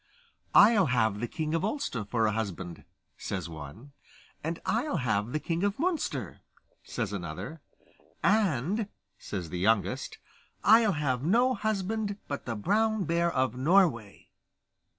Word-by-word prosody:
'I'll 205 -4 +7
have 110 -5 +1
the 120 - -2
king 155 +5 -3
of 165 - 0
Ulster 210 - -2
for 110 +2 0
a 110 - +2
husband,' 95 -5 -4 0.3
says 90 -4 -4
one; 80 - -10 0.5
'and 165 +2 -2
I'll 235 - 0
have 110 -4 0
the 155 - -1
king 170 +3 -2
of 200 0 0
Munster,' 280 - -2 0.4
says - - -4
another; 95 - -6 0.6
'and,' 200 - +2 0.3
says 90 -6 -5
the 90 - -3
youngest, 105 +2 +1 0.5
'I'll 220 -1 +6
have 140 -5 -1
no 235 - +3
husband 210 -1 -2
but 140 -2 -5
the 115 - -2
Brown 215 - +1
Bear 170 0 +1
of 130 -4 0
Norway. 130 - +2
150 Hz, 135 wpm, -29 LUFS, -, 0.6 s, I'll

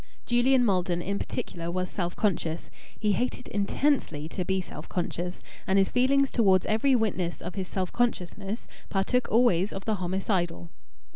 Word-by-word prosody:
Julian 245 +1 +4
Maldon 180 -4 +1
in 200 +3 -2
particular 170 0 -4
was 185 +1 -2
self 175 -2 -2
conscious. 170 -5 -1 0.3
He 210 -1 +2
hated 250 +4 -1
intensely 205 - 0
to 180 - -3
be 190 +1 0
self 185 - -6
conscious, 180 0 -3 0.2
and 190 - +3
his 195 -1 +4
feeling 275 +3 +3
towards 200 -8 +3
every 240 +5 +3
witness 190 -7 0
of 175 - -6
his 190 -2 -3
self 185 -1 -2
consciousness 205 -2 -2 0.2
partook 225 +6 +1
always 210 -5 +4
of 195 - -6
the 220 -2 0
homicidal. 175 -2 -1
195 Hz, 155 wpm, -28 LUFS, 180-235 Hz, 0.3 s, Julian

